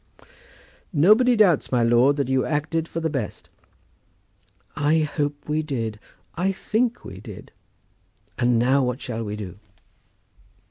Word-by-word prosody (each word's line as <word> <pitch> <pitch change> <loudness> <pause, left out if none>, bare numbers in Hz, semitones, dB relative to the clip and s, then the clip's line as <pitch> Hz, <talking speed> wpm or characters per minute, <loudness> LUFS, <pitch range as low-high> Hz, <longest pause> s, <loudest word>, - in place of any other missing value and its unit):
"Nobody 215 - +5
doubts, 195 -9 +3
my 125 -2 +2
lord, 120 +5 +4
that 140 -3 0
you 130 0 +1
acted 155 +2 -1
for 165 - -4
the 165 - -1
best." 130 -9 -5 1.2
"I 155 +2 +2
hope 145 -1 -3
we 150 +1 0
did. 115 -8 -4 0.3
I 185 +3 0
think 230 +5 -1
we 95 - -9
did. 105 -2 -11 0.9
And 120 -1 +3
now 130 +4 +3
what 125 0 -2
shall 115 -4 -4
we 105 -1 -4
do? 100 -3 -8
145 Hz, 135 wpm, -23 LUFS, 120-160 Hz, 1.2 s, Nobody